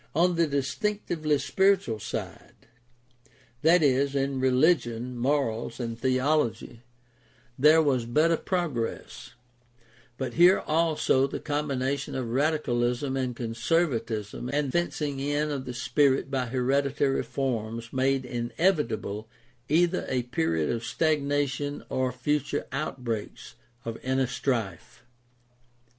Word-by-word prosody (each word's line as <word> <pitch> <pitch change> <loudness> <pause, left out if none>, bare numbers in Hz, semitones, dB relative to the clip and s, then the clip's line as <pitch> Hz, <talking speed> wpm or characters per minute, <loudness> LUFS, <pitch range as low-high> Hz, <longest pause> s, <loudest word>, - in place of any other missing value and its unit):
On 175 +3 +3
the 170 -1 +2
distinctively 155 - -1
spiritual 140 - +2
side - - -6 0.6
— 120 0 -32
i.e., 140 -4 +4
in 135 0 -1
religion, 125 -3 +2
morals, 120 -3 -1
and 115 -2 -3
theology 130 -1 0 0.4
— 120 0 -30
there 160 +1 +7
was 130 -5 +1
better 155 +7 +3
progress; 160 -12 -3 0.8
but 130 -3 -3
here 175 +5 +6
also 155 -4 +2
the - - -5
combination 140 -2 -2
of 125 -3 -3
radicalism 130 -2 0
and 130 -2 -2
conservatism 115 - -1
and 145 -1 0
the - - -4
fencing 150 -4 -1
in 145 +2 0
of 135 -2 -4
the 125 - -5
spirit 135 +1 +2
by 130 -2 -1
hereditary 135 +2 +1
forms 115 -3 -3
made 135 0 +1
inevitable 120 - -1 0.4
either 175 +4 +2
a 125 -2 0
period 80 -10 0
of 115 -1 -3
stagnation 145 -2 0
or 130 -1 0
future 145 +3 -1
outbreaks 125 -6 -4 0.3
of 115 -1 -5
inner 130 +1 +1
strife. 120 - -3
135 Hz, 115 wpm, -27 LUFS, 120-150 Hz, 0.8 s, there